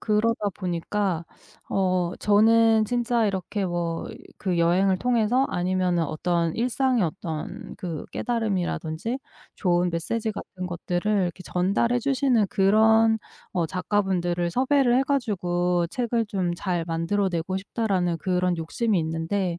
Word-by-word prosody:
그러다 215 0 +1
보니까 180 -1 -2 0.4
어 185 -2 +1
저는 220 +1 +4
진짜 240 0 +1
이렇게 195 +1 -2
뭐 170 -2 -2 0.3
그 185 -3 -1
'여행을 185 +3 +3
통해서 245 +2 +2
아니면은 180 -1 0
어떤 165 +2 -1
일상의 250 0 +1
어떤 160 -2 -5
그 170 -4 -5
깨달음이라든지 215 -2 -2 0.4
좋은 175 -1 +1
메시지 215 +7 -2
같은 185 -2 -7
것들을 175 +3 -2
이렇게 175 +1 -5
전달해 200 +8 +1
주시는 255 -4 +2
그런 220 +3 +4 0.3
어 175 -3 0
작가분들을 180 -2 0
섭외를 260 +2 +3
해 - - +3
가지고 180 -10 0
책을 235 +1 -1
좀 195 -3 -2
잘 175 -1 -2
만들어 170 +4 0
내고 170 +2 -2
싶다.'라는 190 -4 -1
그런 180 +1 0
욕심이 200 +6 0
있는데 165 +3 -2
190 Hz, 295 characters per minute, -25 LUFS, 175-225 Hz, 0.4 s, 저는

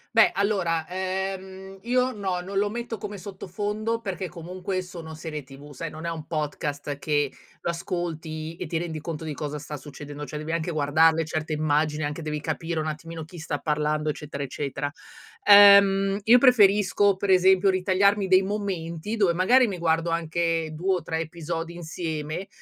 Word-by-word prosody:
Beh 225 - +7
allora, 190 -5 +1
ehm, 190 +1 -4
io 250 +2 +1
no, 190 -4 -2
non 195 +2 -5
lo 205 +1 +2
metto 235 +1 -5
come 205 0 -6
sottofondo 205 +4 -3
perché 190 -4 -4
comunque 185 +2 -4
sono 170 -3 -9
serie 155 -2 -6
TV, 140 +2 -13
sai 165 +5 -5
non 155 +2 -9
è - - -1
un 160 -2 -5
podcast 145 -2 -3
che 145 -1 +1 0.3
lo - - -3
ascolti 165 -2 -4
e - - -5
ti 170 - -2
rendi 160 -2 -4
conto 160 0 -5
di 155 - -3
cosa 150 0 -4
sta 150 +1 -7
succedendo, 145 0 -8
cioè 150 - -6
devi 155 +2 -4
anche 165 +1 -1
guardarle 160 +2 +3
certe 155 0 -3
immagini 150 0 +1
anche, 150 +3 -4
devi 150 -1 -3
capire 165 +2 -3
un 155 - -2
attimino 160 +1 -6
chi 175 +1 -11
sta 155 -2 -3
parlando, 150 0 0
eccetera, 150 -1 -4
eccetera. 140 +1 -3 0.6
Ehm, 200 -1 +8
io 230 +3 +7
preferisco 205 -5 +5
per 195 0 0
esempio 190 +1 +5
ritagliarmi 195 +2 +2
dei 185 0 +6
momenti 195 -1 -3
dove 195 -5 +3
magari 240 +8 +4
mi 195 - -4
guardo 165 0 +1
anche 165 0 0
2 180 +5 0
o 180 - -3
3 160 - -2
episodi 165 +1 -4
insieme, 160 0 -4
170 Hz, 170 wpm, -25 LUFS, 155-195 Hz, 0.6 s, Ehm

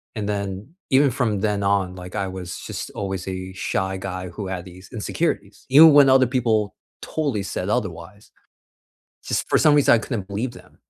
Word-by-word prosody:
And 105 -2 -3
then 100 +1 -4 0.2
even 135 +1 +4
from 115 -6 -1
then 105 -1 0
on, 100 -2 +1
like, 90 +1 -9
I 100 -2 -1
was 95 -2 -6
just - - -5
always 95 -2 -4
a 95 0 -5
shy 95 0 -2
guy 95 -1 -5
who 100 0 -6
had 95 -2 -5
these 95 +1 -13
insecurities. 105 -3 -3
Even 155 +4 +9
when 145 -2 +7
other 130 0 +6
people 115 -5 0 0.3
totally 140 -10 -2
said 95 0 -4
otherwise. 95 0 -4 0.9
Just - - -2
for - - +3
some 150 - +5
reason 145 -4 +5
I - - +4
couldn't 110 -4 -4
believe 105 +6 -3
them. - - -16
100 Hz, 180 wpm, -22 LUFS, 95-120 Hz, 0.9 s, Even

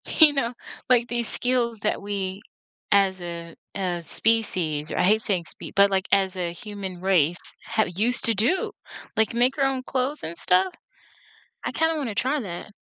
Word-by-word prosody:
you 310 -2 +7
know, 250 -3 -1 0.4
like, 240 -1 +4
these 240 -1 -1
skills 240 -3 0
that 210 - -1
we 200 -1 -4 0.5
as 190 -2 +3
a 170 -1 -7 0.2
as 175 -3 -2
species 175 -9 +1
or - - -3
I - - +3
hate 215 +4 +4
saying 180 -6 -1
spe - - -9
but, 200 0 +6
like, 190 -1 0
as 195 -1 +3
a 175 -2 -2
human 195 -2 -7
race 175 -3 +3 0.3
have 220 - +1
used 235 +5 +2
to 230 - +4
do, 240 - +1 0.5
like, 220 +1 +2
make 250 +4 +2
our 275 - +3
own 265 -1 -1
clothes 265 +4 -2
and 170 +1 -6
stuff. 185 +1 +3 0.9
I - - -1
kinda 320 0 +1
wanna 235 -8 -3
try 270 +6 +1
that. 195 0 -7
205 Hz, 175 wpm, -25 LUFS, 185-240 Hz, 0.9 s, you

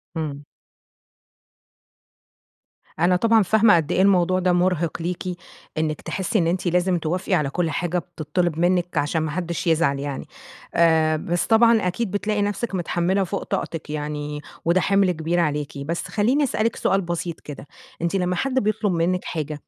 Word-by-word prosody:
إمم. 145 -3 -4 2.5
أنا 180 +2 +4
طبعًا 225 +2 +4
فاهمة 215 0 +5
قد 160 0 0
إيه 185 - +2
الموضوع 185 -1 +3
ده 180 -1 +2
مرهِق 175 -2 0
ليكِ، 175 +1 -3 0.5
إنِّك 155 -1 -1
تحسّي 195 +3 -1
إن 165 - +1
أنتِ 180 +1 -1
لازم 180 +1 +2
توافقي 180 +4 -2
على 150 -6 +2
كل 165 +2 -1
حاجة 175 +3 -1
بتطّلِب 165 0 -2
منِّك؛ 175 0 +1
عشان 150 +3 +1
ما 155 -1 -2
حدّش 170 -1 -3
يزعل 160 -4 +2
يعني. 140 -1 -5 0.5
آآ 160 -2 +4
بس 170 +2 -1
طبعًا 225 -3 +4
أكيد 195 +2 -2
بتلاقي 205 0 -1
نفسِك 205 +1 -2
متحمّلة 180 +2 0
فوق 195 +2 -3
طاقتِك 165 -6 -4
يعني، 150 0 -4 0.2
وده 175 +2 +3
حِمل 195 -2 +3
كبير 165 +1 -1
عليكِ. 150 -3 -1
بس 160 +5 -4
خلّيني 250 +8 +1
أسألِك 230 -3 0
سؤال 195 0 +1
بسيط 170 -1 -4
كده 145 -1 -10 0.3
أنتِ 170 +3 -1
لمّا 180 -1 0
حد 270 +8 -1
بيطلب 215 -2 0
منِّك 175 +2 0
حاجة، 155 -2 -3
175 Hz, 160 wpm, -23 LUFS, 160-190 Hz, 2.5 s, فاهمة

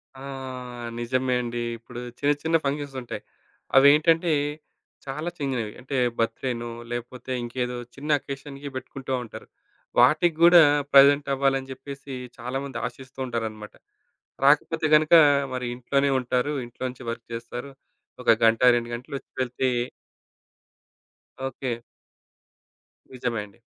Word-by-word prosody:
ఆ! 130 - -12 0.8
నిజమే 130 +2 0
అండి. 120 0 -3 0.2
ఇప్పుడు 120 +1 -10 0.2
చిన్న, 145 +1 +3
చిన్న 165 +1 +1
ఫంక్షన్స్ 140 0 -2
ఉంటాయి. 120 - -6 0.6
అవేంటంటే 155 +5 +6 0.7
చాలా 150 +5 -3
చిన్నవి. 125 -7 -2
అంటే 135 +2 -5 0.2
బర్త్‌డేనో 115 +1 -1 0.2
లేకపోతే 120 +2 -6
ఇంకేదో 125 +1 -3 0.2
చిన్న 145 +2 -7
అకేషన్‌కి 140 +1 -7
పెట్టుకుంటా 130 +1 -5
ఉంటారు. 115 - -10 0.5
వాటికి 155 +2 +5
గూడా 175 0 +9 0.3
ప్రెజెంట్ 140 +1 +7
అవ్వాలని 135 -1 +1
జెప్పేసి 135 +1 -8 0.2
చాలామంది 135 +3 -4
ఆశిస్తూ 130 +3 -9
ఉంటారనమాట. 110 -3 -4 0.7
రాకపోతే 150 +3 +3
గనక 155 +2 +3 0.4
మరి 125 -1 -3
ఇంట్లోనే 140 +3 +1
ఉంటారు. 125 +3 0
ఇంట్లో 120 +2 -10
నుంచి 125 -1 -10
వర్క్ 115 0 -5
జేస్తారు. 120 +3 -6 0.5
ఒక 115 - +6
గంట, 115 0 +4 0.2
2 120 0 -2
గంటలొచ్చి 135 +3 -8
వెళ్తే 130 +1 -1 1.8
ఓకే. 130 -2 -3 1.4
నిజమే 120 -3 -2
అండి. 100 +1 -21
130 Hz, 110 wpm, -25 LUFS, 120-140 Hz, 1.8 s, గూడా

